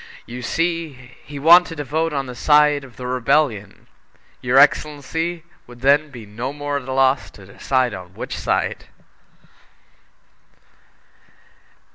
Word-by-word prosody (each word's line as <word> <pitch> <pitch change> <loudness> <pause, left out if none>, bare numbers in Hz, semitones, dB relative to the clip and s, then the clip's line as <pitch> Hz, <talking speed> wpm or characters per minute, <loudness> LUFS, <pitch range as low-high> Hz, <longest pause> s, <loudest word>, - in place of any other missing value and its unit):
You 125 +1 -8
see, 165 +3 -2 0.3
he 145 - -10
wanted 170 +3 +5
to 145 - -4
vote 160 +4 -1
on 140 -2 -2
the 125 - -8
side 150 +2 +3
of 130 -3 -14
the 125 - -7
Rebellion! 125 -4 0 0.6
Your - - +1
excellency 160 +3 +1 0.2
would 120 0 -14
then 145 +3 +3
be 120 -5 -11
no 115 +6 -5
more 145 0 -3
at 135 -2 -8
a - - -4
loss 135 0 +2
to 100 - -15
decide 125 +5 -1
on 90 -1 -10
which - - -6
side!" - - -2
140 Hz, 135 wpm, -20 LUFS, 125-150 Hz, 0.6 s, wanted